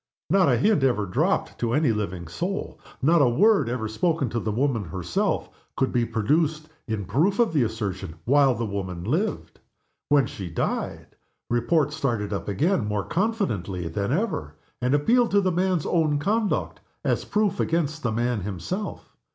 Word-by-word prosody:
Not 190 -5 +5
a 125 - +4
hint 200 - +3
ever 120 -6 +2
dropped 90 - 0
to 115 -1 0
any 150 -3 +3
living 95 -5 -3
soul, 180 - -4 0.2
not 165 +3 +5
a 130 - +5
word 180 - +4
ever 120 -3 -2
spoken 155 +3 0
to 115 - -2
the 110 - -2
woman 120 -2 0
herself, 85 +1 -1 0.3
could 130 - 0
be 120 -2 +2
produced 150 +8 0 0.2
in 110 -3 -2
proof 155 - +1
of 235 -7 +2
the 150 - +3
assertion 105 -7 -3
while 135 0 +4
the 115 +1 -2
woman 95 -4 -4
lived. 170 - -2 0.5
When 145 -3 +5
she 95 -6 -7
died 80 - -3 0.4
Report 145 +5 +2
started 120 -9 -1
up 100 - -4
again 130 - +1
more 105 -1 -1
confidently 130 - -1
than 100 +6 -2
ever, 135 - -1 0.3
and 125 +3 +2
appealed 235 +11 +3
to 200 0 +3
the 185 -1 +1
man's 180 -2 +1
own 155 -4 +2
conduct 210 +7 0 0.3
as - - +1
proof 210 -2 0
against 155 -2 0
the 120 - -1
man 120 0 0
himself. 105 - -5
130 Hz, 165 wpm, -25 LUFS, 105-170 Hz, 0.5 s, Not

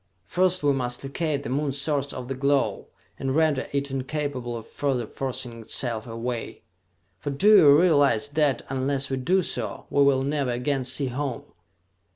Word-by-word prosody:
First 185 -2 +1
we 145 -1 +4
must 125 -2 -3
locate 140 +1 -2
the - - -5
Moon 140 +2 0
source 140 0 -1
of 125 -1 -7
the 135 - -2
glow, 140 +1 0 0.3
and 135 0 -1
render 155 -4 +2
it 140 0 -2
incapable 135 -3 -3
of 115 - -9
further 135 -3 -2
forcing 125 -3 -5
itself 115 0 -3
away! 115 +1 -5 0.6
For 145 - -4
do 200 +10 +5
you 145 -3 +7
realize 145 -7 +3
that, 145 -4 +1
unless 135 +1 -1
we 135 - 0
do 180 +9 +2
so, - - -3
we 140 - +3
will 140 -1 +4
never 140 -1 -1
again 125 +2 -1
see 130 +1 0
home?" 130 -1 -3
140 Hz, 170 wpm, -25 LUFS, 125-145 Hz, 0.6 s, you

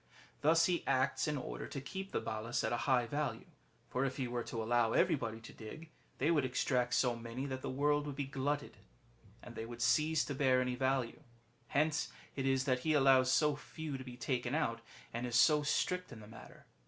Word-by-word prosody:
Thus 165 +2 +5
he 175 -2 0
acts 130 +3 +1
in 150 -1 0
order 130 - -5
to 140 - -5
keep 190 +8 -6
the - - 0
Balas 110 +1 -2
at - - 0
a 120 +3 -2
high 125 -2 +4
value; 130 -2 -3 0.4
for 130 - -1
if 135 -1 -2
he 130 -3 -1
were 120 0 -2
to 115 -1 -3
allow 115 0 +2
everybody 110 0 +1
to 115 - -11
dig, 155 +9 -10 0.3
they 150 +5 +2
would 150 -4 +3
extract 125 -1 +1
so 125 -2 +2
many 115 +3 -5
that 130 -2 -4
the - - -4
world 145 +2 +1
would 145 - -5
be 140 0 -2
glutted 140 +1 -2
with - - -22
them, - - -23 0.6
and - - -10
they 110 - -5
would 120 0 -8
cease 155 +4 +3
to 145 - -3
bear 130 -2 +3
any 125 0 0
value. 130 +1 -1 0.5
Hence 150 +2 +1 0.2
it 135 -1 -1
is 135 -1 +2
that 130 -2 +2
he 155 +4 +1
allows 135 -2 +5
so 150 +2 +3
few 150 0 -6
to 130 - -6
be 125 -1 -9
taken 125 +1 -1
out, 115 -8 0 0.3
and 120 +2 -2
is 120 - -3
so 150 +5 +6
strict 180 +4 0
in 120 - -9
the 105 - -11
matter. 110 - -13
130 Hz, 220 wpm, -35 LUFS, 120-145 Hz, 0.6 s, so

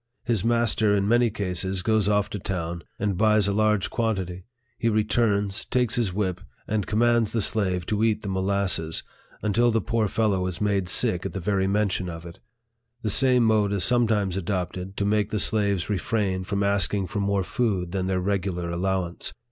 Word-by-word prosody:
His 115 -6 0
master, 115 -3 +2
in 100 0 +1
many 120 +1 +3
cases, 95 -2 -2
goes 110 -2 +2
off 105 -1 +2
to 105 - -4
town, 85 -3 -4
and 100 -4 -2
buys 105 -2 +3
a 100 - 0
large 105 -1 +1
quan 115 -2 0
tity; 90 -1 -6 0.3
he 115 - +1
returns, 105 -2 +1
takes 125 -3 0
his 115 -6 +1
whip, 95 -2 -2 0.3
and 105 -2 -1
commands 115 0 +2
the 115 - +1
slave 95 -5 +1
to 105 +2 -1
eat 110 -1 +1
the - - -5
molasses, 95 -4 0 0.4
until 110 +3 +2
the 115 -1 +2
poor 110 +1 0
fellow 100 -4 0
is 90 -1 -4
made 100 -3 0
sick 95 -3 +2
at - - -5
the 95 - -3
very 95 +1 0
mention 100 -2 0
of 80 0 -8
it. 85 0 -11 0.6
The 110 - +1
same 125 +1 +4
mode 110 -3 +2
is 100 - 0
sometimes 110 -6 +2
adopted 95 0 -4
to 100 - 0
make 105 0 +1
the 110 - -2
slaves 100 -3 +1
refrain 95 -1 -1
from 100 +2 -1
ask 100 0 +2
ing 100 -2 -1
for 100 - -4
more 100 -1 0
food 95 -5 -1
than 95 -1 -2
their 95 -1 0
regular 90 -2 -2
allowance. 90 0 -2
100 Hz, 190 wpm, -25 LUFS, 95-110 Hz, 0.6 s, same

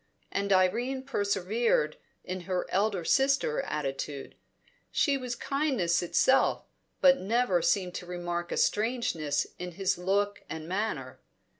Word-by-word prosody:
And 200 0 -1
Irene 235 +8 +2
persevered 200 - 0 0.3
in 185 0 -5
her 180 -1 0
elder 195 -3 +1
sister 270 - +2
attitude; 140 -1 -4 0.6
she 285 -3 +2
was 250 -2 -3
kindness 265 - 0
itself, 260 +9 +3 0.4
but 270 -1 +6
never 200 -3 +2
seemed 180 0 +1
to 175 - -8
remark 175 -1 -4
a - - -2
strangeness 210 - +1
in 180 0 -5
his 190 0 0
look 200 +3 0
and 160 0 -6
manner. 180 -10 -3
190 Hz, 125 wpm, -29 LUFS, 175-240 Hz, 0.6 s, but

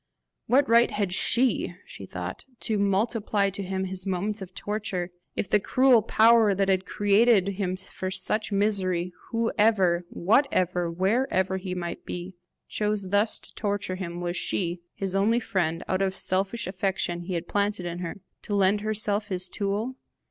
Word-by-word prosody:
What 270 +3 +4
right 235 +1 +5
had 200 -3 -2
SHE, 235 -2 +1
she 95 - -10
thought, 90 0 -6 0.2
to 215 -3 -1
multiply 200 0 +1
to 200 - -6
him 190 0 -2
his 190 0 -4
moments 200 +3 -2
of 185 -1 -9
torture? 200 -4 -3 0.2
If - - -2
the 210 - +4
cruel 255 +3 +4
power 220 -1 +5
that 195 0 +1
had 190 0 +1
created 205 -1 +3
him 190 -2 -2
for 185 0 -5
such 215 +3 -1
misery, 185 -4 0 0.2
whoever, 210 -6 +2
whatever, 180 - +1
wherever 190 +1 +1
he 185 -1 -5
might 175 -1 -5
be, 180 +2 -6 0.3
chose 210 -2 -1
thus 205 +2 +3
to - - -13
torture 200 -3 -2
him, 175 -2 -5
was 175 0 -2
she, 175 -1 -1
his 195 -1 -2
only 215 +4 +3
friend, 175 -8 -1
out 185 +1 0
of 190 -1 +1
the - - -5
selfish 195 +5 +1
affection 185 -2 -2
he 180 +1 -4
had 170 0 -3
planted 205 -2 -1
in 175 0 -4
her, 180 +2 -6 0.2
to 205 - -3
lend 200 +1 +3
herself 210 -1 0
his 185 -2 -1
tool? 205 +7 -2
195 Hz, 165 wpm, -26 LUFS, 185-210 Hz, 0.3 s, right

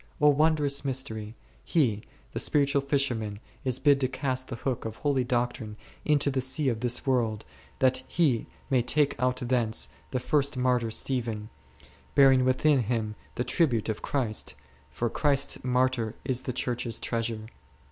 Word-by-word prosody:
O 150 -1 +6
wondrous 145 -1 +2
mystery! 115 -5 -4 0.3
he, 120 -11 +1 0.3
the - - -2
spiritual 140 -1 +2
fisherman 125 -7 -1 0.2
is 130 -2 0
bid 140 0 +4
to 130 - +3
cast 130 0 -3
the 120 - -5
hook 125 +1 -3
of 110 -1 -5
holy 140 -1 +1
doctrine 120 -3 -2 0.3
into 145 -1 +3
the 130 -1 0
sea 130 +2 +1
of 115 -3 -2
this 120 0 -1
world, 115 -5 0 0.3
that 130 -1 +3
he 140 -10 +1 0.2
may 130 -2 +4
take 145 +4 +2
out 125 0 +2
thence 120 -3 0 0.2
the 130 - -1
first 140 +1 +1
martyr 125 -2 +1
Stephen, 115 -3 -2 0.6
bearing 135 -2 +6
within 135 +3 +3
him 110 -2 -1 0.2
the 125 - 0
tribute 125 - +1
of 110 - -3
Christ; 110 - -2 0.3
for 115 - -2
Christ's 140 +3 +1
Martyr 125 -3 +1
is 130 -1 0
the 125 - -3
Church's 120 -2 -2
Treasure. 115 -2 -3
125 Hz, 155 wpm, -28 LUFS, 115-140 Hz, 0.6 s, O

